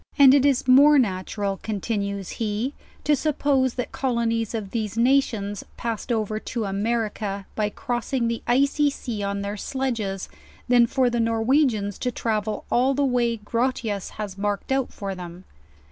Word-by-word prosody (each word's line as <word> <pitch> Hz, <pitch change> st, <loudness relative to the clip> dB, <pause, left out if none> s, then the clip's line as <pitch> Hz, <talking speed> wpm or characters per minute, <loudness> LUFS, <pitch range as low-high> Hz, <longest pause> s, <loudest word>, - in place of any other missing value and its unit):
And 275 Hz, -2 st, +8 dB
it 280 Hz, -1 st, +4 dB
is 270 Hz, -2 st, +1 dB
more 285 Hz, +4 st, +7 dB
natural, 195 Hz, -3 st, -1 dB
con 215 Hz, -2 st, -3 dB
tinues 200 Hz, -2 st, -3 dB
he, 225 Hz, +4 st, -1 dB, 0.3 s
to 295 Hz, -, +3 dB
suppose 275 Hz, -3 st, +1 dB
that 250 Hz, -, -3 dB
colonies 230 Hz, -3 st, -1 dB
of 205 Hz, -3 st, -4 dB
these 220 Hz, -2 st, -3 dB
nations 230 Hz, -5 st, +1 dB
passed 230 Hz, +1 st, -3 dB
over 215 Hz, -2 st, -1 dB
to 230 Hz, 0 st, -4 dB
America 205 Hz, -1 st, -2 dB
by 210 Hz, -1 st, 0 dB
crossing 240 Hz, +2 st, -2 dB
the 230 Hz, 0 st, -2 dB
Icy 280 Hz, +4 st, +3 dB
Sea 235 Hz, -6 st, -5 dB
on 200 Hz, 0 st, -2 dB
thoir 200 Hz, +1 st, -4 dB
sledges, 225 Hz, -6 st, -2 dB, 0.4 s
than 240 Hz, -1 st, +5 dB
for 255 Hz, 0 st, +2 dB
the 240 Hz, -, 0 dB
Norwegians 225 Hz, -2 st, +1 dB
to 250 Hz, -, 0 dB
travel 215 Hz, -2 st, -2 dB
all 260 Hz, +3 st, +3 dB
the 285 Hz, +1 st, +2 dB
way 240 Hz, -3 st, +1 dB
Grotias 225 Hz, -2 st, -2 dB
has 200 Hz, -2 st, -6 dB
marked 205 Hz, +4 st, -2 dB
out 265 Hz, -1 st, +1 dB
for 195 Hz, -1 st, -5 dB
them. 180 Hz, 0 st, -9 dB
230 Hz, 160 wpm, -24 LUFS, 205-255 Hz, 0.4 s, And